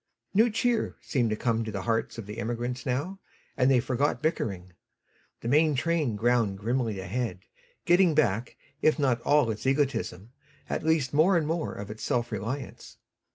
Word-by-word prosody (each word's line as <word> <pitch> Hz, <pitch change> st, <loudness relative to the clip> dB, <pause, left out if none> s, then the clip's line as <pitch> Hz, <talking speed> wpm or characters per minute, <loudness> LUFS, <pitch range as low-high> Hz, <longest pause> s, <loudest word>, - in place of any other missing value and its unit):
New 225 Hz, +4 st, +5 dB
cheer 235 Hz, +1 st, 0 dB
seemed 120 Hz, -5 st, 0 dB
to 110 Hz, -, 0 dB
come 115 Hz, 0 st, 0 dB
to 110 Hz, -, -5 dB
the 100 Hz, -2 st, -4 dB
hearts 115 Hz, 0 st, -1 dB
of 115 Hz, -, -6 dB
the 105 Hz, +3 st, -7 dB
emigrants 120 Hz, +2 st, -3 dB
now, 145 Hz, +10 st, -2 dB, 0.4 s
and 130 Hz, 0 st, +3 dB
they 130 Hz, -2 st, +5 dB
forgot 130 Hz, +4 st, 0 dB
bickering. 100 Hz, -, -2 dB, 0.7 s
The -, -, -5 dB
main 150 Hz, +3 st, +4 dB
train 145 Hz, -4 st, 0 dB
ground 115 Hz, -2 st, +1 dB
grimly 115 Hz, 0 st, -1 dB
ahead, 105 Hz, +1 st, -3 dB, 0.4 s
getting 175 Hz, -2 st, +4 dB
back, 120 Hz, -5 st, +1 dB, 0.2 s
if 155 Hz, -, +4 dB
not 130 Hz, -5 st, +1 dB
all 145 Hz, -5 st, +3 dB
its 110 Hz, +3 st, -5 dB
egotism, 125 Hz, -8 st, -1 dB, 0.4 s
at -, -, -2 dB
least 155 Hz, -5 st, +1 dB
more 170 Hz, +5 st, +5 dB
and 160 Hz, -, 0 dB
more 165 Hz, +1 st, -2 dB
of 100 Hz, +1 st, -7 dB
its 110 Hz, -, -9 dB
self 120 Hz, -1 st, -1 dB
reliance. 115 Hz, +7 st, -5 dB
125 Hz, 170 wpm, -28 LUFS, 110-150 Hz, 0.7 s, New